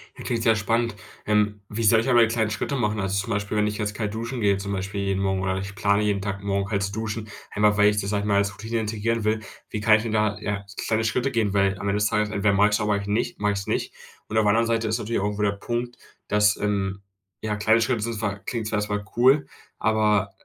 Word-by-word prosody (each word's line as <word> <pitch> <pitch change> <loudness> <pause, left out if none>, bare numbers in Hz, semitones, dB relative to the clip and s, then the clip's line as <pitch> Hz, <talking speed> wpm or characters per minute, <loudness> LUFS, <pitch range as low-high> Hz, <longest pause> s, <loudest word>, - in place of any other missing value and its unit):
Klingt 115 -2 -3
sehr 115 -1 +4
spannend. 115 +2 0 0.3
Ähm. 105 -1 +1
Wie 115 +2 -3
soll 110 +1 +5
ich 130 - -2
aber 120 -2 +6
kleine 110 -1 0
Schritte 105 +7 -2
machen? 105 -4 0
Also, 95 0 0
zum - - -9
Beispiel, 105 +1 -2
wenn 105 - +3
ich 105 - -3
jetzt 105 -1 -2
kalt 105 -1 -3
duschen 115 +2 -4
gehe, 100 -2 +3
zum 100 +1 -4
Beispiel 100 +1 -3
jeden 95 -1 -1
Morgen, 95 -1 0
oder 95 0 -1
ich 95 +1 -5
plane, 100 0 +2
jeden 100 -2 0
Tag 100 -1 -4
morgen 100 0 -1
halt 100 -2 0
zu 100 - -2
duschen, 110 +1 -4 0.2
einfach 105 0 +2
weil 105 0 +6
ich 105 0 0
das, 100 - -4
sage 105 -1 0
ich 105 - -3
mal, 100 - +2
als 100 0 +1
Routine 110 +3 -3
integrieren 110 +1 -1
will. 110 +1 +1 0.3
Wie 105 - -3
kann 110 +1 +5
ich 110 - 0
denn 115 - -3
da, 105 -1 +1
ja, 100 -1 -3 0.2
kleine 110 0 +1
Schritte 125 +5 0
gehen? 110 -4 0
Weil 100 -1 +2
am 100 - -4
Ende 100 +1 +1
des 105 - +3
Tages 105 0 +1
entweder 100 -1 +1
mache 100 +1 +5
ich - - -3
es - - 0
oder 105 - -1
mach 100 - -2
ich 100 - -7
nicht 105 +3 -1
mache 105 0 +1
ich 100 - -2
es 95 - -8
nicht. - - -2 0.3
Und 110 - -2
auf 110 - +4
der 105 - +3
anderen 115 +2 +3
Seite 115 -1 0
ist 110 - +1
natürlich 115 +2 -2
auch - - 0
irgendwo 105 0 -1
der 100 - +3
Punkt, 120 +4 -4 0.3
dass, 105 0 +3
ähm, 100 -1 -1 0.4
ja, 105 -1 -2
kleine 110 +2 +3
Schritte 115 -1 0
sind 115 +1 -2
zwar 100 -2 -2
klingt 110 +3 -4
zwar 110 - -1
erst 105 0 -3
mal 105 0 -2
cool, 135 +4 +4 0.3
aber 105 -2 +2
105 Hz, 275 wpm, -24 LUFS, 100-110 Hz, 0.4 s, aber